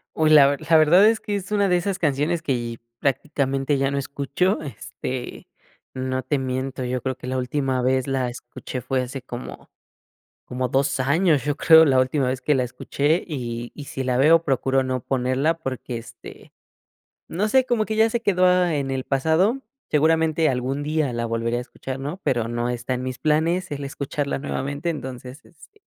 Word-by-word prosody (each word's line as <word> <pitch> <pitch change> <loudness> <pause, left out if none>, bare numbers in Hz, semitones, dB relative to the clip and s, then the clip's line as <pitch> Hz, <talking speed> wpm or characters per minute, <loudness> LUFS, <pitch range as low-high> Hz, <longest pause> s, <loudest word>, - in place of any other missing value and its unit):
Uy, 155 -1 +3
la 150 -2 +8
ver 140 +1 0
la 165 - +7
verdad 170 +6 +6
es 225 - 0
que 205 - -3
es 195 0 -5
una 205 -1 +2
de 180 - +4
esas 190 +2 -2
canciones 160 +1 0
que 120 -5 -2 0.2
prácticamente 135 0 0
ya 135 0 +1
no 140 - -2
escucho. 140 +8 -1
Este, 130 -3 -6 0.5
no 130 0 -2
te 140 +3 -1
miento, 130 0 -3
yo 125 0 -2
creo 130 0 -2
que - - -10
la 130 +1 -2
última 130 0 -1
vez 130 0 +1
la 130 -2 0
escuché 120 +1 -7
fue 130 +1 -1
hace 130 +1 -6
como 125 -1 -9 0.7
como 125 0 -3
2 140 +1 0
años, 145 +2 +2
yo 145 -1 0
creo, 160 +1 +7
la 135 -3 +3
última 130 +1 0
vez 130 +1 -2
que 150 - +2
la 130 - +1
escuché 145 +6 -1
y 120 -6 -5
y 145 - -9
si 135 - -5
la 125 -1 0
veo, 160 +5 +5
procuro 135 -1 +1
no 130 0 -2
ponerla 130 +6 0
porque, 130 -5 -5
este, 115 0 -12 0.8
no 205 +5 -1
sé, 260 +3 +3
como 235 -4 +1
que 220 - -3
ya 220 +1 +5
se 230 +1 -2
quedó 180 -3 +3
en 145 -6 -1
el 130 -1 -2
pasado, 160 - +1 0.3
seguramente 160 +1 +3
algún 130 +2 -2
día 150 -3 0
la 115 0 -2
volvería 115 +1 -1
a - - -2
escuchar, 130 +1 -7
¿no?, 150 +7 -5
pero 120 -3 0
no 120 +1 -2
está 125 +1 -3
en 125 - -3
mis 130 0 -5
planes 165 +5 +1
el 145 -1 -4
escucharla 140 +1 -3
nuevamente, 140 +3 -3
entonces, 130 -2 -6
este, 290 - -20
135 Hz, 190 wpm, -23 LUFS, 130-160 Hz, 0.8 s, la